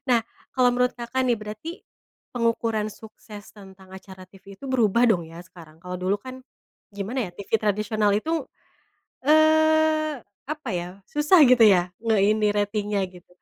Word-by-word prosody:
Nah, 240 -2 +4 0.4
kalau 250 -1 +4
menurut 250 0 +1
Kakak 240 +2 -3
nih, 240 - +2
berarti 215 +9 -7 0.6
pengukuran 230 -2 -1
sukses 215 -1 -13
tentang 190 -2 -15
acara 190 -1 -12
TV 195 +1 -15
itu 195 - -14
berubah 235 -2 +2
dong 175 -7 0
ya, 165 +1 -11
sekarang? 165 -4 -16
Kalau 180 0 -6
dulu 185 +2 0
kan, 260 +3 -10 0.5
gimana 205 +3 -3
ya, - - -12
TV 200 - -10
tradisional 210 0 0
itu, 315 +5 -2 0.8
eee, 315 -1 +3 0.3
apa 305 0 -5
ya, 175 0 -4 0.2
susah 300 +4 +4
gitu 250 -2 +5
ya, 185 -4 +4
nge 225 -1 +1 0.2
ini, 215 -1 +1
ratingnya 205 -1 -1
gitu, 180 -1 -17
215 Hz, 150 wpm, -24 LUFS, 195-255 Hz, 0.8 s, gitu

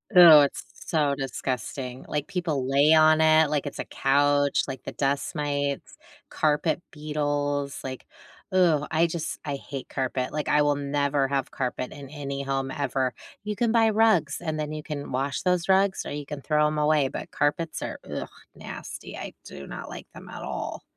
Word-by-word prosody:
Ew, 165 -4 +11
it's 140 -1 +1 0.2
so 150 -4 +2
disgusting, 130 -1 -4
like, 150 -1 -2
people 170 -9 -2
lay 140 +4 +4
on 155 0 +6
it 155 -1 +5
like 150 -1 0
it's 145 - -6
a - - -1
couch, 145 +1 +2
like, 135 -2 -6
the - - -6
dust 140 +4 -1
mites, 145 -1 -2 0.3
carpet 155 +2 +1
beetles, 145 -2 -2
like 130 -1 -6 0.5
ugh, 165 -6 +3
I 165 +2 +3
just 165 -1 -4
I 145 -2 -3
hate 135 -1 -8
carpet, 130 -1 -2
like, 150 -1 -3
I 150 - +4
will 145 -1 +2
never 140 -1 0
have 135 -1 -1
carpet 125 -1 -3
in 140 -2 -10
any 140 -2 -5
home 135 -1 -2
ever; 135 -3 -1 0.3
you 210 -1 -4
can 235 -1 +1
buy 225 -1 +5
rugs, 220 -4 +3
and 155 -2 -3
then 150 0 -3
you 155 0 -4
can 150 -2 -6
wash 135 +1 -1
those 180 -1 +1
rugs, 190 0 +3
or - - -5
you 145 0 -5
can 145 0 -6
throw 150 0 +2
'em 150 0 -2
away, 150 -2 +3
but - - -6
carpets 155 +2 -1
are, - - -5
ugh, - - -4 0.3
nasty, - - -8
I - - -7
do 70 - -10
not - - -7
like - - -9
them - - -11
at - - -8
all. - - -5
145 Hz, 185 wpm, -26 LUFS, 140-155 Hz, 0.5 s, Ew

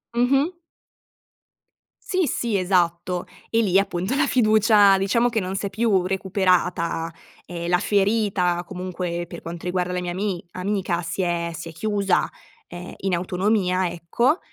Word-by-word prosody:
Mh-mh. 270 +8 +2 1.5
Sì, 370 -4 +1
sì, 230 -6 -1
esatto. 180 -1 0 0.2
E 230 0 +2
lì 195 -2 +3
appunto 190 +2 -1
la 290 0 +2
fiducia 215 -4 +5
diciamo 235 +5 +2
che 225 - 0
non 190 -1 -3
s'è 200 0 -2
più 195 -3 +1
recuperata. 180 -3 0 0.3
Ehm, 170 -1 -5
la 180 0 +3
ferita 195 -4 +1
comunque, 180 -2 -4
per 170 0 -9
quanto 170 +1 -7
riguarda 180 0 -1
le 180 - -1
mia 175 -1 -3
ami 190 -1 -3
amica, 185 -2 -1
si 170 +3 -3
è 170 -1 -1
si 165 +1 -7
è - - -9
chiusa, 200 +2 0 0.4
ehm, 175 +1 -9
in 190 -2 0
autonomia, 185 0 +1
ecco; 235 - 0
185 Hz, 145 wpm, -23 LUFS, 175-210 Hz, 1.5 s, fiducia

